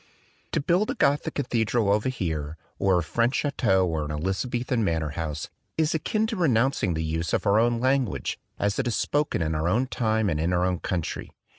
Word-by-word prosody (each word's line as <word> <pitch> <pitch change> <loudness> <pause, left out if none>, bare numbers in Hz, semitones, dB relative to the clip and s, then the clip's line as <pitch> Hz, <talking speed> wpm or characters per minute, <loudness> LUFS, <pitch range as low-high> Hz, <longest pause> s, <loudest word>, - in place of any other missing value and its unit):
To - - +2
build 175 +8 +1
a - - -1
Gothic 145 +1 +1
cathedral 115 -5 +1
over 105 +5 +1
here 80 - -3 0.2
or 95 -2 +3
a 85 - +1
French 115 - +1
chateau 95 -10 +2
or 80 -2 -1
an 75 - -5
Elizabethan 115 - -1
manor 80 -5 0
house, 75 -1 -4 0.3
is 155 -1 +2
akin 215 +7 0
to 220 0 -2
renouncing 130 - +2
the 80 - -1
use 80 +1 -2
of - - 0
our 100 +1 +4
own 120 0 +2
lan 130 +1 +3
guage 70 - -4 0.2
as 100 +3 0
it 130 - 0
is 120 - 0
spoken 145 - 0
in 80 0 -1
our 80 +2 0
own 120 +7 +2
time 110 -4 0
and 80 -5 0
in 85 +3 0
our 90 0 +2
own 90 -2 0
country. 85 -4 -3
105 Hz, 205 wpm, -26 LUFS, 80-130 Hz, 0.3 s, our